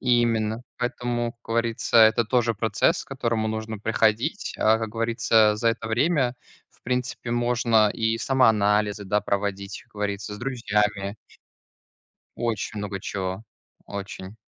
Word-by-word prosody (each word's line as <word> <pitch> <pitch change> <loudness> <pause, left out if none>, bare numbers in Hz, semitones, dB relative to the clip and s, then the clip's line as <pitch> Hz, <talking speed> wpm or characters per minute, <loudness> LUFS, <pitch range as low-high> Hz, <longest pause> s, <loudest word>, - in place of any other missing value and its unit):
Именно, 115 -2 +1 0.2
поэтому, 120 -1 -2
как 115 - -42
говорится, 115 0 +1
это 110 +1 +6
тоже 120 0 +1
процесс, 110 - +1
к - - -25
которому 115 -5 -1
нужно 110 0 -4
приходить, 110 - 0
а, 110 +1 +4
как 110 -1 -3
говорится, 115 -1 +2
за 115 +2 +1
это 115 -1 -2
время, 130 +1 +1 0.4
в - - -31
принципе, 125 -1 -3
можно 120 -2 +3
и 115 +1 0
самоанализы, 105 -4 +2
да, 105 +2 +1
проводить, 100 -1 -3
как - - -31
говорится, 105 0 -3
с - - -9
друзьями. 105 -5 -1 1.2
Очень 115 -2 -3
много 100 -1 -4
чего, 95 +1 -4 0.4
очень. 100 0 -7
110 Hz, 130 wpm, -25 LUFS, 105-120 Hz, 1.2 s, это